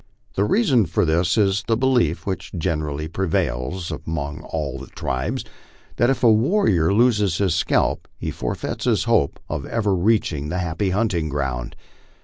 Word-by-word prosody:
The 100 - +1
reason 130 - +3
for - - +1
this 85 +4 +2
is 100 -1 +2
the 115 -1 +2
belief, 120 - +1
which 95 -2 -4
generally 75 -3 -2
prevails 85 -2 -2
among 75 -2 -4
all 70 -4 -4
the 70 - -9
tribes, 65 0 -3 0.5
that 120 - +3
if 135 - 0
a 115 - +7
warrior 110 - +3
loses 105 -5 +3
his 95 -4 +1
scalp 85 - +1
he - - -4
forfeits - - -4
his - - +2
hope 70 - +1
of - - -3
ever 105 -4 0
reaching 85 -7 +1
the 90 - -2
happy 90 +2 -1
hunting 95 -5 0
ground. 65 -4 -3
90 Hz, 155 wpm, -22 LUFS, 75-105 Hz, 0.5 s, a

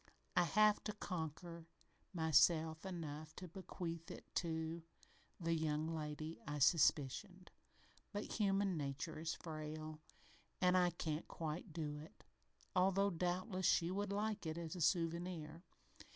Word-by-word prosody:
I 175 - +5
have 210 +5 +5
tried - - -21
to 210 - -1
conquer 170 -3 -5 0.4
myself 160 0 +4
enough 155 -4 -5
to 180 - -7
bequeath 170 -2 -5
it - - -8
to 165 -1 -1 0.6
the 165 -1 +1
young 155 -1 +1
lady 155 +1 -4
I 150 0 -2
suspicioned, 165 +5 +3 0.6
but 205 +1 -4
human 195 -2 +3
nature 150 +2 -3
is 165 +1 -1
frail, 155 -1 -6 0.6
an' 180 0 +5
I 180 -1 +5
can't 160 -2 -3
quite 165 +3 -4
do 150 -2 -3
it, 155 - -12 0.5
although 195 +2 +4
doubtless 185 +2 0
she 170 +1 +4
would 200 +1 -1
like 210 -2 -1
it 160 +1 -2
as 170 +1 -4
a 180 - -4
souvenir. 165 -1 0
165 Hz, 135 wpm, -40 LUFS, 155-185 Hz, 0.6 s, I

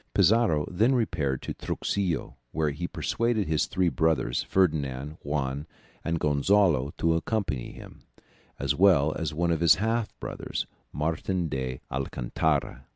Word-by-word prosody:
Pizarro 95 -6 +4
then 110 +9 +2
repaired 80 - 0
to - - -4
Truxillo, 90 -9 -2 0.2
where 75 -1 0
he 85 +5 -4
persuaded 115 -2 0
his 80 -1 +1
three 95 -2 +1
brothers 80 -8 +1
Ferdinand, 75 -5 0
Juan, 70 0 -2 0.4
and 85 0 -1
Gonzalo 75 -1 +3
to 85 0 +2
accompany 80 - -2
him, - - -12 0.6
as - - 0
well 80 -3 +4
as 80 -2 -3
one 85 +3 0
of 80 - +1
his 85 -2 +6
half 115 +2 0
brothers - - -4 0.3
Martin 80 +4 -1
d'Alcantara. 65 +1 -2
80 Hz, 130 wpm, -27 LUFS, 70-95 Hz, 0.6 s, his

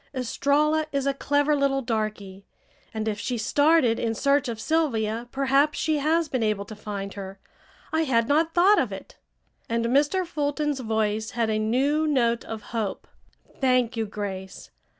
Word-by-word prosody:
Estralla 295 +5 +1
is 275 -1 -1
a 275 - +1
clever 290 +2 +1
little 275 -1 +1
darky, 215 -4 -3 0.5
and 220 0 -4
if 210 -1 -2
she 245 +3 -2
started 285 +1 +3
in 225 -1 -1
search 280 +2 +2
of 225 -2 -5
Sylvia 235 -6 0
perhaps 275 +2 +2
she 310 -2 0
has 320 +3 +1
been 255 -4 -2
able 215 -2 0
to 215 - -9
find 200 -2 -6
her. 195 -1 -8 0.6
I 320 0 +2
had 230 -4 +2
not 320 +3 +1
thought 385 +4 +5
of - - -1
it," - - -10 0.5
and 230 0 0
Mr. 290 +9 +2
Fulton's 295 -3 -2
voice 220 -2 -1
had 225 -2 +1
a 215 - 0
new 275 +8 +1
note 235 -5 +1
of 220 -1 -7
hope. 220 -4 -3 0.5
"Thank 255 -2 +2
you, 225 -1 -2
Grace. 195 -2 -7
250 Hz, 165 wpm, -25 LUFS, 220-290 Hz, 0.6 s, thought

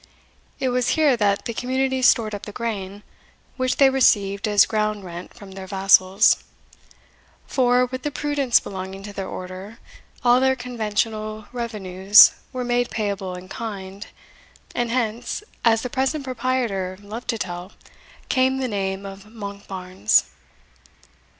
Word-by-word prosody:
It 260 - 0
was 250 0 +1
here 300 -5 +4
that 200 -3 +1
the 235 - -3
community 260 +2 -1
stored 225 -3 +4
up 205 - -6
the - - -6
grain, 205 -3 -5 0.5
which 255 -1 -1
they 270 -1 +6
received 205 -6 +2
as 205 -1 +5
ground 215 -2 -1
rent 175 0 -9
from 200 -5 -12
their 190 0 -8
vassals; 195 +1 +4 1.0
for, 250 -1 +3
with 255 +1 -6
the 295 - -2
prudence 290 -4 +1
belonging 190 0 -7
to 205 0 -8
their 195 -1 -5
order, 185 +4 -8 0.5
all 245 0 +5
their 265 0 +3
conventional 215 -3 -3
revenues 205 -4 +5 0.2
were 255 -1 -3
made 245 0 0
payable 200 -4 -3
in 180 +1 -10
kind, 200 -2 -7 0.7
and 240 -1 -1
hence, 235 - -2 0.2
as 225 -1 +3
the - - -2
present 275 +3 -1
proprietor 235 -7 -2
loved 210 +4 -8
to 235 -2 -1
tell, 180 -1 -5 0.6
came 260 0 +2
the 265 -1 -1
name 195 -2 -3
of 195 0 -9
Monkbarns. 200 - -1
215 Hz, 140 wpm, -23 LUFS, 195-250 Hz, 1.0 s, they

